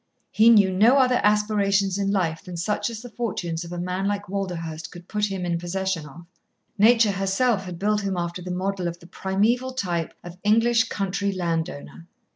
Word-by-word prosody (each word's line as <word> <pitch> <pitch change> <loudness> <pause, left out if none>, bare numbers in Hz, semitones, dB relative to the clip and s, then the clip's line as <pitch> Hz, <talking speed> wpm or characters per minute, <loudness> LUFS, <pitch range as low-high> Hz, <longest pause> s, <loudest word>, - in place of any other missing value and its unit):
He 220 +2 +5
knew 200 -5 +5
no 225 +8 +5
other 255 -2 +4
aspirations 205 -2 +2
in 195 0 0
life 175 -5 0
than 180 -3 -8
such 210 +7 -1
as 230 0 -7
the 245 - -8
fortunes 180 -8 -3
of 170 - -9
a 175 - -5
man 180 +2 -2
like 205 0 -2
Walderhurst 170 -5 -4
could 175 0 -12
put 210 -1 0
him 190 -2 -4
in 170 -1 -1
possession 175 -2 -2
of. 170 +5 -13 0.5
Nature 225 0 +5
herself 195 +2 0
had 180 -2 -7
built 210 +3 +1
him 195 -2 -2
after 170 +1 -3
the 180 - -7
model 185 0 -2
of 170 0 -4
the 170 - -16
primeval 220 +9 0
type 175 -9 -2
of 175 +1 -10
English 230 +2 +3
country 200 0 -1
land 170 -3 -1
owner. 165 +3 -11
195 Hz, 195 wpm, -24 LUFS, 175-210 Hz, 0.5 s, He